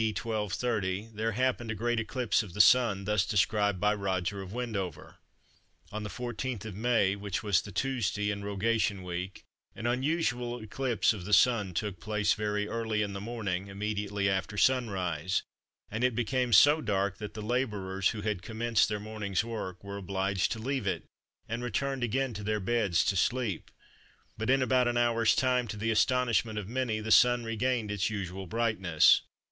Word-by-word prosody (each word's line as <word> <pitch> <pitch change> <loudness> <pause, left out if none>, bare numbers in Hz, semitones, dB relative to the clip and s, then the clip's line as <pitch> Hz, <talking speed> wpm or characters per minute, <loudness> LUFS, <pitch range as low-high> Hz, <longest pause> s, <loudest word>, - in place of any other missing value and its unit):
D. - - +2
1230, 105 -2 -2
there 110 +1 -1
happened 125 0 0
a 110 - -2
great 120 +2 0
eclipse 115 0 0
of 95 -6 -9
the - - -6
Sun, 105 -4 +5
thus 105 0 +2
described 105 -2 +1
by 105 +2 +3
Roger 100 -1 -2
of 95 -1 -8
Wendover:—"On 110 - -7
the 105 - -5
14th 120 0 -4
of 110 - -6
May, 105 -2 +2
which 100 +2 -4
was 100 -2 +3
the 100 - -10
Tuesday 105 -3 -1
in 100 -1 -5
Rogation 100 -1 0
Week, 90 +1 -5 0.3
an 110 - -7
unusual 125 -2 0
eclipse 120 +1 0
of 100 -5 -7
the 105 +3 -3
Sun 105 -3 +4
took 100 -3 -2
place 105 +1 +1
very 105 -1 -1
early 110 -2 -1
in 100 -1 -4
the 100 - -5
morning, 100 -4 -3
immediately 100 0 -2
after 95 +1 -1
sunrise; 95 - +1 0.5
and 115 +3 -2
it 125 -2 +2
became 125 +1 0
so 145 +9 +7
dark 100 -2 -1
that 105 0 -7
the 110 - -5
labourers, 105 -6 0
who 110 - -4
had 100 -3 -2
commenced 110 +1 +1
their 105 -1 -2
morning's 105 -2 -2
work, 105 -6 -6
were 100 0 -6
obliged 95 0 -1
to - - -2
leave 130 -1 -2
it, 90 -3 -1 0.4
and 115 +2 -3
returned 135 +1 -2
again 130 +2 0
to 105 - -6
their 105 +1 0
beds 95 -5 +1
to 100 - +1
sleep; 115 -2 0 0.7
but 110 +2 -3
in 135 0 +4
about 130 -1 +3
an 120 0 0
hour's 115 -1 +3
time, 125 -2 +2
to 105 - -6
the 110 +2 0
astonishment 115 -2 +2
of 105 -2 -4
many, 120 -2 -1
the 110 0 -4
Sun 120 +1 +6
regained 115 -1 -1
its 105 -1 0
usual 95 -3 -5
brightness." 95 -6 +3
105 Hz, 175 wpm, -30 LUFS, 100-120 Hz, 0.7 s, so